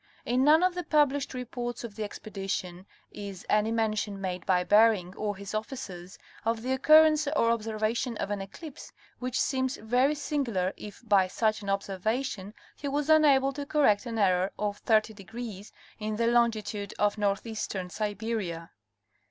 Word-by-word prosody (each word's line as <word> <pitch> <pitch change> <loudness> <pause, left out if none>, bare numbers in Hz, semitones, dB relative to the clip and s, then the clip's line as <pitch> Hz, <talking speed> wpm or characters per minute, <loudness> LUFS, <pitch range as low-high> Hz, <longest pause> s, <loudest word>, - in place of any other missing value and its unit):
In 250 +2 +2
none 310 +4 +6
of 365 0 +3
the 355 0 -4
published 285 -4 +1
reports 245 -1 -5
of 235 -3 -7
the 220 - -3
expedition 195 -3 -5 0.2
is 200 -3 -8
any 210 +1 +2
mention 215 -3 -1
made 185 -2 -4
by 180 -2 +3
Bering 205 -3 +4
or 210 -1 -2
his 200 +1 -8
officers 210 -5 -6 0.3
of 225 0 -1
the 255 - -2
occurrence 310 +3 +5
or 255 -6 +2
observation 225 +1 -1
of 200 - -3
an 205 -1 -2
eclipse, 270 - -10 0.3
which 255 0 -2
seems 260 -1 0
very 250 +6 +2
sin 290 0 -1
gular 190 -6 -1
if 210 +3 -10
by 195 -3 +4
such 215 +3 0
an 200 - -5
observation 200 +2 -2 0.2
he 285 - -6
was 290 +2 0
enabled 275 -3 +4
to 285 - -3
correct 255 -8 +3
an 230 -1 -4
error 185 -2 +3
of 205 -1 -3
30° 215 -1 -1 0.3
in 215 0 -3
the 230 +2 0
longitude 225 -4 +1
of 210 +1 +1
northeastern 200 -2 -2
Siberia. 205 -5 -3
220 Hz, 160 wpm, -28 LUFS, 200-255 Hz, 0.3 s, none